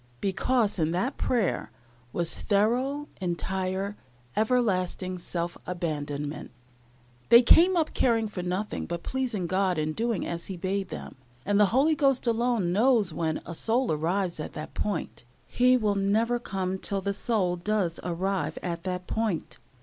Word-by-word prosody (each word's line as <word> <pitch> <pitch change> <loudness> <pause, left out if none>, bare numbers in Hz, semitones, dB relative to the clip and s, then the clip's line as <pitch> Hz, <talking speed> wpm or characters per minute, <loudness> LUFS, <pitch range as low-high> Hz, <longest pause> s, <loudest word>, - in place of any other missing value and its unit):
Because 205 - +1
in 155 -1 +2
that 245 +11 -1
prayer 230 -8 0 0.4
was 170 +3 0
thorough, 250 +8 +1
entire, 190 +2 -2 0.4
everlasting 190 -5 0
self 170 0 -4
abandonment. 150 -4 -3 0.8
They 235 +1 +9
came 350 +8 +6
up 320 -2 +1
caring 225 -3 +2
for 200 -3 -5
nothing 185 +4 -3
but 170 0 -4
pleasing 250 -8 -2
God 185 0 +1
and 155 0 -1
doing 230 -2 -1
as 170 0 -4
He 190 - -5
bade 190 +1 -2
them; - - -7 0.3
and 205 +1 +2
the 210 - +6
Holy 275 +9 +3
Ghost 275 -4 +2
alone 235 -6 +1
knows 220 -4 +3
when 160 -1 -2
a 170 - -6
soul 235 +7 +1
arrives 170 +3 -1
at 155 - -5
that 155 - -7
point. 205 -10 -3 0.2
He 255 +1 +4
will 215 -4 +1
never 215 +5 +1
come 190 -4 -3
till 195 0 -1
the 200 +1 -1
soul 195 -4 0
does 180 -1 -1
arrive 185 +2 -1
at 170 -2 -3
that 180 -1 -3
point. 220 -6 -2
195 Hz, 150 wpm, -27 LUFS, 175-230 Hz, 0.8 s, They